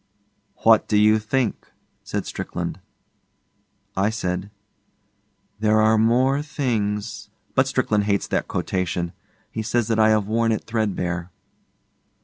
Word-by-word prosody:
'What 110 -1 +5
do 105 - +2
you 110 +1 +5
think?' 115 +2 -1 0.4
said - - -3
Strickland. - - -4 1.2
I 100 +2 +2
said, 95 -3 -3 1.1
'"There 110 0 +3
are 110 +1 +5
more 130 +5 +3
things.. 115 -8 -2
."' - - -41
But - - +3
Strickland 105 -1 +1
hates 100 -1 +1
that - - -1
quotation. 90 -2 -2 0.4
He 110 - -3
says 120 +1 0
that 110 -1 +1
I 110 0 +6
have 110 -2 +3
worn 115 +2 +1
it 110 - -3
threadbare. 90 -6 -2
110 Hz, 130 wpm, -23 LUFS, 100-115 Hz, 1.2 s, I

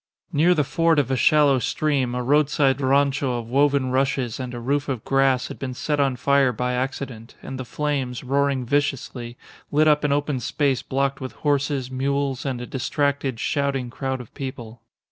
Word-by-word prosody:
Near 170 +5 +4
the 150 - +2
ford 165 +3 +2
of 140 -2 +1
a - - +2
shallow 145 +1 +4
stream 135 -2 0
a 125 - -2
roadside 140 0 +2
rancho 135 -1 +2
of 115 -1 -6
woven 140 -1 +2
rushes 130 -3 0
and 130 -1 -4
a 120 - -6
roof 140 +4 -1
of 125 -5 -3
grass 135 -2 +2
had - - -8
been 130 -2 -4
set 150 +2 -1
on 135 -2 +2
fire 140 +1 +3
by 125 +2 -2
accident, 125 -2 -4
and 130 0 -6
the 130 - -4
flames, 140 -4 -2
roaring 140 -1 0
viciously, 130 -3 -2 0.3
lit 155 +2 +4
up 150 -1 +4
an 145 - +1
open 145 -1 0
space 135 +2 0
blocked 135 +1 -1
with 130 - -5
horses, 140 -2 0
mules, 140 0 -1
and 130 -3 -2
a - - -5
distracted, 140 -1 -1
shouting 135 -3 -1
crowd 130 +1 -3
of 125 - -11
people. 120 -4 -7
135 Hz, 185 wpm, -23 LUFS, 125-145 Hz, 0.3 s, Near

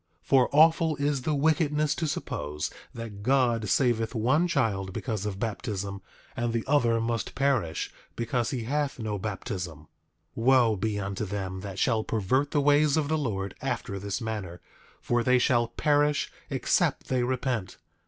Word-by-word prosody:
8:15 - - -30
For 130 -2 +5
awful 160 +1 +5
is 145 -1 0
the 150 +3 0
wickedness 150 0 +2
to 160 - -2
suppose 75 - -3 0.2
that 110 -3 -8
God 120 -3 +2
saveth 120 -1 +1
one 130 +10 +2
child 105 - 0
because 105 -3 -3
of 100 -2 -4
baptism, 100 -3 -3 0.3
and 120 0 -1
the 115 -1 0
other 125 -5 +3
must 115 -2 -2
perish 130 -12 0 0.2
because 120 0 -1
he 125 -4 -3
hath 145 +4 -1
no 110 -3 -3
baptism. 95 - -5
8:16 75 - -20 0.5
Wo 120 -1 +4
be 105 +1 -2
unto 100 +1 -3
them 95 -1 -4
that 95 0 -7
shall 115 -2 +2
pervert 120 +8 0
the 145 - +1
ways 145 +1 +4
of 150 -2 0
the 160 - +2
Lord 100 -8 -2
after 120 -7 -3
this 100 0 -3
manner, 105 -6 -5 0.4
for 120 0 0
they 125 +1 +4
shall 120 -1 +3
perish 145 +4 +1 0.2
except - - +1
they 130 -1 +1
repent. 125 -5 -2
120 Hz, 165 wpm, -27 LUFS, 100-140 Hz, 0.5 s, For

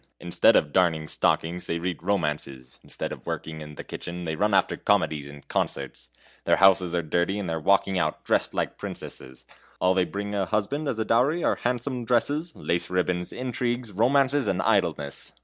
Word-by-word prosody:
Instead 85 0 +4
of 75 - +2
darning 80 -4 +2
stockings, 85 +3 0
they 85 - -1
read 85 -1 -3
romances; 75 -9 -2
instead - - -5
of - - -9
working 80 -1 -4
in 75 0 -9
the - - -7
kitchen, 90 0 -6
they 80 -1 -2
run 105 +6 +1
after 100 - +3
comedies 70 -2 +1
and 70 0 -13
concerts. - - -3 0.4
Their - - +4
houses 95 -2 +4
are 85 - 0
dirty, 85 +5 0
and 100 -3 -3
they 80 - -2
are 80 - -2
walking 95 +2 +2
out, 75 -3 -1
dressed - - +1
like - - -2
princesses; 65 0 -8 0.3
all 90 0 +3
they 95 -1 +2
bring 100 +1 -5
a 100 -2 0
husband 135 - -1
as 115 - -1
a 110 - -1
dowry 135 +10 +2
are - - +2
handsome 125 +1 -1
dresses, 145 +8 +1
lace 85 0 -1
ribbons, 90 -1 -1
intrigues, 120 -2 -2
romances, 135 +6 +2
and 90 - 0
idleness! 85 -9 0
90 Hz, 185 wpm, -26 LUFS, 80-115 Hz, 0.4 s, Instead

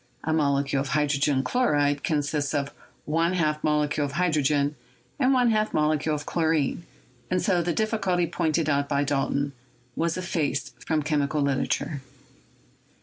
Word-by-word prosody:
A 160 - 0
molecule 140 -2 +1
of 140 - -3
hydrogen 145 -2 +1
chlo 250 - +1
ride 145 -1 +1
consists 145 -2 -1
of 140 0 -2 0.3
one 165 +3 +1
half 155 -4 0
molecule 150 -1 +1
of 140 -1 -3
hydrogen 150 -4 +1 0.4
and 260 -1 +3
one 250 -3 +4
half 215 0 0
molecule 155 0 +1
of 145 0 -6
chlorine, 160 -1 0 0.4
and 185 - +1
so 180 -3 +2
the 170 +1 -1
difficulty 195 -3 0
pointed 160 -1 0
out 140 -1 +1
by 140 -1 +1
Dalton 140 0 -1 0.4
was 165 +1 0
effaced 160 -6 -2
from 155 -2 0
chemical 150 0 0
literature. 140 +1 -1
150 Hz, 145 wpm, -26 LUFS, 145-170 Hz, 0.4 s, one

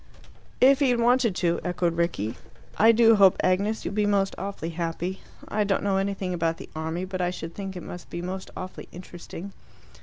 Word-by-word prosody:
"If 270 +2 +6
he 280 -3 +3
had 245 -1 +2
wanted 240 -3 +3
to," 170 -2 +1
echoed 175 -1 0
Rickie. 165 - -1 0.4
"I 225 +2 +6
do 225 -1 +5
hope, 195 -2 +6
Agnes, 200 +4 +1
you'll - - -3
be 210 0 +1
most 195 -1 +2
awfully 195 -4 -5
happy. 170 +3 -3 0.3
I 210 0 0
don't 200 -1 0
know 195 -1 +1
anything 195 -1 -1
about 165 -1 0
the - - -10
army, 160 +3 -3
but 185 -1 -4
I 175 - +1
should 165 -2 -6
think 195 -2 -6
it 180 - -6
must 175 - -9
be 170 - -5
most 185 +1 -5
awfully 185 0 -7
interesting." 180 +2 -9
185 Hz, 200 wpm, -26 LUFS, 175-205 Hz, 0.4 s, If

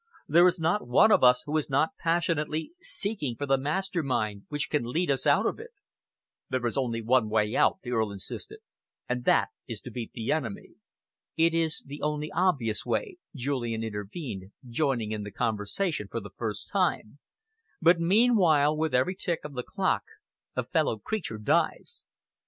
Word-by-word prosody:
There 170 +4 +6
is 180 0 +1
not 165 0 0
one 130 - +5
of - - +5
us 125 0 +6
who 150 - -3
is 150 - -1
not 140 +4 +2
passionately 165 - 0
seeking 205 - -1
for 145 - -3
the 135 -1 +3
master 175 +5 -1
mind 110 -8 -2
which 150 -1 0
can 150 -4 +1
lead 150 +7 0
us 135 - 0
out - - +4
of - - -1
it." 460 +2 -9 0.8
"There 130 -1 -1
is 120 - -1
only 115 -4 -1
one 115 -1 +3
way 105 0 +1
out," 190 - +3
the 125 - -5
Earl 110 -3 +1
insisted, 100 -2 -7 0.5
"and 125 0 -2
that - - +4 0.2
is - - -5
to - - -9
beat 120 -3 -6
the 115 -1 -2
enemy." 140 -10 -3 0.7
"It 165 0 +4
is 165 -1 0
the 145 +2 -8
only 150 0 -2
obvious 135 - +1
way," 405 -7 -2 0.2
Julian 120 -4 -2
intervened, 105 - -6 0.2
joining 120 -4 0
in 105 -1 -3
the 105 - -6
conversation 110 - -1
for - - -4
the - - -10
first - - -4
time, 110 +7 0 0.6
"but 170 +1 +5
meanwhile, 170 -6 +4
with 155 -3 0
every 130 +9 +2
tick 175 -2 -2
of 150 - -7
the 125 - -3
clock - - 0 0.5
a - - 0
fellow 110 - 0
creature 170 - -4
dies." 105 - 0
140 Hz, 175 wpm, -28 LUFS, 115-165 Hz, 0.8 s, There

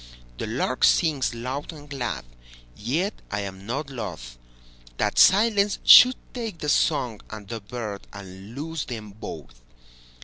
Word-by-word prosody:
The - - -3
lark - - -2
sings 145 -7 +3
loud 130 +6 -5
and 150 -2 -12
glad, 135 - -4 0.5
Yet 155 - -1 0.2
I 105 - -2
am 95 0 -8
not 135 +6 -2
lothThat - - -6
silence 205 0 +5
should 255 +1 +9 0.2
take 225 -7 -5
the 150 - -3
song 125 -7 +1
and 110 -2 -9
the 115 +1 -6
birdAnd 100 -2 -8
lose 160 +2 -4
them 110 -4 -7
both. 100 - -10
120 Hz, 130 wpm, -25 LUFS, 100-150 Hz, 0.5 s, should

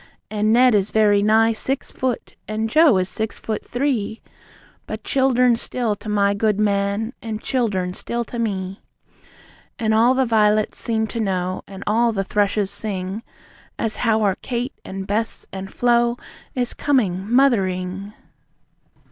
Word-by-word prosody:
And 215 0 +1
Ned 250 +1 +5
is 205 -1 +2
very 210 -2 +4
nigh 220 +2 +4
six 265 +5 -2
foot, 255 -3 -3
and 220 +1 -2
Joe 310 - +6
is 185 -1 0
six 220 +3 -3
foot 215 -1 -4
three! 245 -5 -1 0.7
But - - -6
childern 250 -2 +3
still 230 -2 -2
to 215 - -8
my 200 -1 +2
good 210 0 +1
man, 205 +2 0
and 220 -2 -4
childern 205 -8 -1
still 235 +5 -3
to 235 +1 -7
me! 195 -3 -3 1.0
And 220 -2 +1
all 235 +4 +4
the 265 0 +2
vi'lets 215 -2 +2
seem 220 -2 0
to 230 +1 -5
know, 185 -3 -1
and 195 0 -9
all 230 +3 +2
the 195 -2 -1
thrushes 205 0 0
sing, 195 0 -4 0.6
As 220 -2 -2
how 220 -2 +2
our 195 -2 +2
Kate, 245 +1 -3
and 190 0 -6
Bess 220 +3 -2
and 190 0 -6
Flo 240 0 +2 0.4
is 250 -1 0
coming 205 -8 0
Mothering. 195 -6 +1
215 Hz, 150 wpm, -21 LUFS, 200-235 Hz, 1.0 s, Joe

